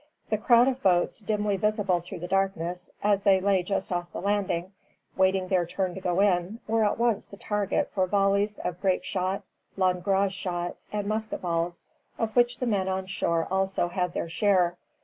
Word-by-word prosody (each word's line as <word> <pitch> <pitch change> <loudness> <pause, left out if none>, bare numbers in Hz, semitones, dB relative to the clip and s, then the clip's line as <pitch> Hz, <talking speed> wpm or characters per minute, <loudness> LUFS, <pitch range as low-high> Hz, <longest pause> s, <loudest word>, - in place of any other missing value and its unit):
The 215 - +3
crowd 240 +2 +5
of 265 0 -1
boats, 180 -5 +2
dimly 210 -2 0
visible 205 -3 +1
through 175 +1 -9
the 175 - -4
darkness, 180 -2 -1
as 205 -1 +3
they 195 -2 +4
lay 195 -1 +2
just 190 +1 -2
off 175 -1 -2
the - - -5
landing, 195 -3 -1 0.4
waiting 190 0 +2
their 185 -2 +2
turn 185 0 -2
to 190 - -7
go 180 +1 +1
in, 195 +2 +1
were 225 0 +2
at 205 - +1
once 235 -2 +1
the 200 - -12
target 210 -1 -1
for 185 -2 +1
volleys 200 +2 +2
of 180 0 -4
grape 190 -2 +1
shot, 185 0 -2 0.3
langrage 190 +1 +1
shot, 175 -2 -3 0.2
and 210 -1 -2
musket 215 0 -3
balls, 170 0 -2 0.3
of 225 -1 -2
which 240 0 +3
the 250 - -2
men 200 -5 0
on 190 0 -1
shore 170 -3 0
had - - -10
also 190 -2 +1 0.2
their 170 - -3
share. 180 0 +2
195 Hz, 190 wpm, -27 LUFS, 180-205 Hz, 0.4 s, crowd